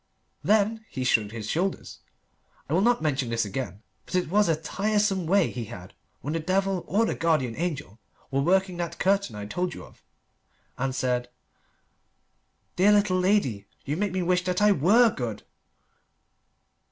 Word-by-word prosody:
Then 220 +1 +2
he 130 - -4
shrugged 110 -4 +2
his 110 -1 -6
shoulders 180 - -2 0.7
I 145 - -3
will 180 - +3
not 240 0 +2
mention 140 -5 0
this 115 -1 0
again, 105 0 -5 0.2
but - - -5
it 180 -3 +1
was 205 -1 +3
a 165 - +3
tiresome 195 +2 0
way 190 -1 +3
he 120 -2 -5
had 90 -2 -10 0.3
when 150 - -3
the 165 - 0
devil 190 +2 0
or 215 +4 +2
the - - -1
guardian 155 -8 0
angel 145 - -4 0.3
were 135 0 +1
working 185 +3 +2
that 170 -1 -4
curtain 195 - +1
I 105 0 -6
told 180 +12 -3
you - - -9
of - - -20 0.7
and 130 0 -2
said 125 -1 -1 1.5
"Dear 200 +3 +5
little 200 -3 +3
lady 180 - +1 0.2
you 145 - -1
make 205 +2 -1
me 185 0 -1
wish 180 +1 +1
that 180 0 0
I 210 0 +5
were 210 - +5
good." 115 - -5
175 Hz, 165 wpm, -26 LUFS, 130-195 Hz, 1.5 s, Dear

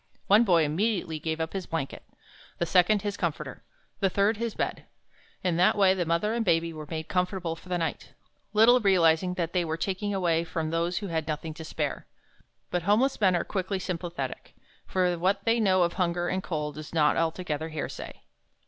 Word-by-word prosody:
One 210 +4 +6
boy 175 -7 +4
immediately 165 0 -1
gave 160 +1 -3
up 160 0 -3
his 190 -3 -4
blanket, 160 -4 -4 0.6
the 170 - 0
second 185 +4 +3
his 205 -1 -2
comforter, 170 -5 -3 0.4
the 195 - +2
third 200 +3 +2
his 230 -1 -3
bed. - - -3 0.6
In 180 -3 +1
that 180 +4 +4
way 195 -2 +5
the 180 -3 -2
mother 170 +6 +1
and 235 0 0
baby 165 -3 +1
were 155 -1 -8
made 160 -1 -4
comfortable 180 -2 -1
for 180 - -15
the 180 - 0
night, 165 -2 -4 0.4
little 225 +4 +6
realizing 180 -3 +3
that 170 -2 -2
they 180 -2 +2
were 160 -1 -2
taking 190 +4 -2
anything 205 - -1
away 170 -3 +1
from 160 -1 -3
those 170 +1 0
who 200 -2 -3
had 160 -2 -2
nothing 155 +1 -3
to 160 +1 -9
spare. 155 - -3 0.6
But 180 - 0
homeless 220 +8 +2
men 185 -3 +4
are 175 - +1
quickly 190 0 -2
sympathetic, 175 -2 -5 0.3
for 180 -2 +1
what 195 +3 +1
they 230 +1 +3
know 185 -4 +4
of 170 0 0
hunger 175 -1 0
and 185 - -1
cold 150 -4 -4
is 155 +2 -9
not 150 -2 +4
altogether 160 -1 -1
hearsay. 155 -2 -6
175 Hz, 195 wpm, -27 LUFS, 165-195 Hz, 0.6 s, One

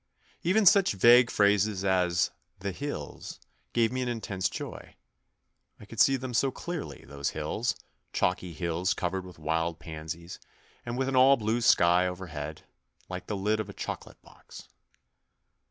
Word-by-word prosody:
Even 200 +5 +3
such 195 - +6
vague 120 +5 +6
phrases 100 -1 +2
as 90 -3 +2
" - - -43
the 100 0 -2
hills 145 +10 -6 0.2
" - - -42
gave 115 -1 +3
me 130 0 -2
an 125 - -2
intense 105 -5 -2
joy. - - -8 0.8
I - - -12
could 110 +2 -10
see 135 - +6
them 130 -1 -6
so 135 +4 +2
clearly, 165 +4 -6
those 70 0 -3
hills, - - -1 0.4
chalky 90 -1 -1
hills 85 +4 -1
covered 95 +1 -2
with 90 - -13
wild 80 +1 -1
pansies, 80 +2 -7 0.5
and 120 +1 -3
with 130 0 0
an 135 - -1
all 135 +2 +7
blue 110 +2 0
sky 90 -4 +5
overhead, 80 -5 -6 0.5
like 90 0 -6
the 105 - -2
lid 105 +3 0
of 105 -2 -4
a - - -8
choco - - -5
late - - -20
box. - - -14
100 Hz, 165 wpm, -28 LUFS, 85-120 Hz, 0.8 s, all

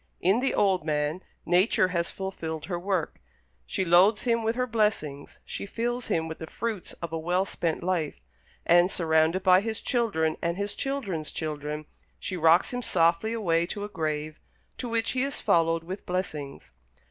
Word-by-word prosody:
In 195 +6 +3
the 270 - 0
old 190 -4 +2
man, 150 +2 -1 0.2
Nature 185 +1 +3
has 170 -1 -1
fulfilled 165 -5 -5
her 175 0 -3
work; 185 -3 -2 0.5
she 190 - -1
loads 185 +5 +5
him 230 -2 +2
with 225 +1 0
her 250 0 +1
blessings; 210 - -1
she - - -5
fills 240 +3 -2
him 160 0 0
with 160 - -7
the 160 - -6
fruits 220 -4 -4
of 165 -1 -4
a 165 - -1
well 180 +4 +1
spent 170 -3 -2
life; 170 - -1 0.5
and, 175 +1 +5
surrounded 160 +1 +2
by 185 0 +6
his 220 0 -3
children 195 - 0
and 170 +1 -1
his 200 +1 -2
children's 205 - -3
children, 150 -1 -4 0.3
she 185 - -4
rocks 165 +5 +4
him 245 - -2
softly 170 +1 +2
away 170 -7 +1
to 205 +2 -5
a 205 - -5
grave, 155 -4 -3 0.4
to 245 - -4
which 230 0 0
he 255 - 0
is 275 +1 -1
followed 165 0 +2
with 185 +4 -7
blessings. 150 - -4
180 Hz, 175 wpm, -27 LUFS, 160-210 Hz, 0.5 s, by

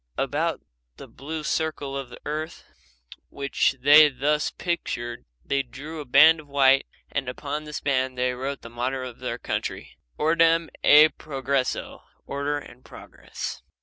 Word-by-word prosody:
About - - -1 0.4
the - - -10
blue 155 +4 -7
circle 150 -3 -2
of 135 -2 -5
the 120 - -12
earth 155 +2 -4 0.7
which 140 0 0
they 150 +3 +8
thus 145 +3 0
pictured 120 -9 -4 0.2
they 140 - +1
drew 150 +5 -9
a 150 - -6
band 155 +5 +6
of 150 - -13
white, 135 -1 +4 0.2
and 135 -3 -2
upon 145 +4 -5
this 150 0 -6
band 130 -2 0
they 125 0 +1
wrote 135 +2 -4
the 115 - -9
motto 130 +2 -3
of 120 - -11
their - - -4
country, - - -5 0.2
"Ordem 165 +1 +3
e 150 +1 +8
Progresso, 135 -4 -3 0.2
order 140 +1 -2
and 130 -3 -12
progress." - - -8
140 Hz, 150 wpm, -25 LUFS, 130-155 Hz, 0.7 s, they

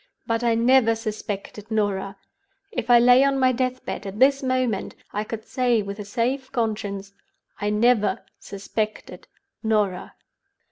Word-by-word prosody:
But 230 +1 -1
I 235 -1 +3
never 235 0 +4
suspected 210 -1 -6
Norah. 200 -3 -1 0.5
If 245 -1 -4
I 240 - +8
lay 245 +2 +6
on 275 -1 +2
my 255 -1 +4
death 255 0 -2
bed - - -5
at 195 +1 -7
this 275 +3 +4
moment 255 -6 -1 0.2
I 210 - -1
could 220 0 -7
say 245 -4 +1
with 200 +1 -7
a 210 - -6
safe 255 +5 -2
conscience 205 -4 -3 0.5
I 205 - -1
never 210 -2 +2
suspected 210 +2 -5 0.3
Norah. 210 -5 -1
225 Hz, 145 wpm, -24 LUFS, 205-250 Hz, 0.5 s, I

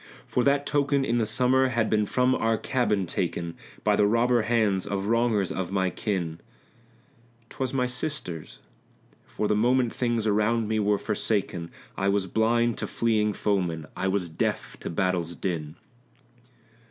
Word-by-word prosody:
For 125 - 0
that 140 0 +3
token 140 -1 +1
in 120 -1 +1
the 110 - +1
summer 130 +4 +3
had 115 -4 0
been 105 -1 +1
from 125 +3 +2
our 115 -2 +1
cabin 105 -7 0
taken 85 -1 -2 0.3
By - - +3
the 105 - +4
robber 120 +2 +3
hands 110 -4 +1
of 100 -1 -2
wrongers 115 -3 +1
of 95 -1 -3
my 95 -2 +1
kin; 85 -6 -3 1.1
'Twas 130 -3 -3
my 130 -2 +1
sister's 125 - -4 0.7
for 105 - -2
the 105 - +2
moment 120 +2 +2
things 120 -3 0
around 110 +2 +2
me 110 0 0
were 105 0 +2
forsaken; 100 -5 -2 0.3
I 95 - 0
was 100 -1 +1
blind 115 +4 +1
to - - -3
fleeing 110 -2 +1
foemen, 90 -7 -1
I - - -1
was 95 -2 0
deaf 80 - -2
to - - -5
battle's 85 -1 -1
din. 80 -5 -3
105 Hz, 155 wpm, -26 LUFS, 95-120 Hz, 1.1 s, the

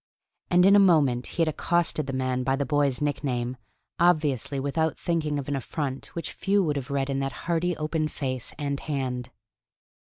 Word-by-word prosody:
And 180 +1 +5
in 200 +1 +7
a - - +8
moment 145 -10 +4
he 170 - +4
had - - 0
accosted 155 -1 0
the - - -2
man 130 -1 -1
by 135 +1 +1
the 140 +1 -1
boy's 140 0 +1
nickname, 130 -4 -1 0.4
obviously 150 -6 +2
without 155 +4 0
thinking 155 -4 -1
of 140 - -4
an 145 - -1
affront 135 +1 -4
which 170 - -4
few 200 +1 +1
would 150 -4 0
have 140 -1 -4
read 140 0 -1
in 135 - -1
that 135 0 -1
hearty 170 0 0
open 155 0 -1
face 130 -4 -3
and 140 -2 -2
hand. 130 -4 -3
145 Hz, 185 wpm, -26 LUFS, 135-160 Hz, 0.4 s, a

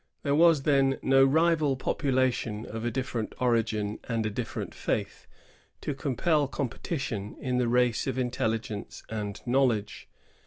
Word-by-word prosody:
There 140 - +1
was 160 -2 +5
then 135 -2 +3
no 135 0 +5
rival 155 0 +3
population, 130 -5 0
of 115 +1 -6
a 120 - 0
different 125 -3 -3
origin 110 -4 0
and 115 -2 -1
a 110 - -1
different - - -4
faith, - - -3 0.5
to 145 - -2
compel 145 +2 +1
competition 130 - -4
in 125 -1 -1
the 125 - +1
race 125 -1 +2
of - - -2
intelligence 115 -3 -2
and 105 -2 -4
knowledge. 120 -5 0
125 Hz, 140 wpm, -28 LUFS, 110-135 Hz, 0.5 s, was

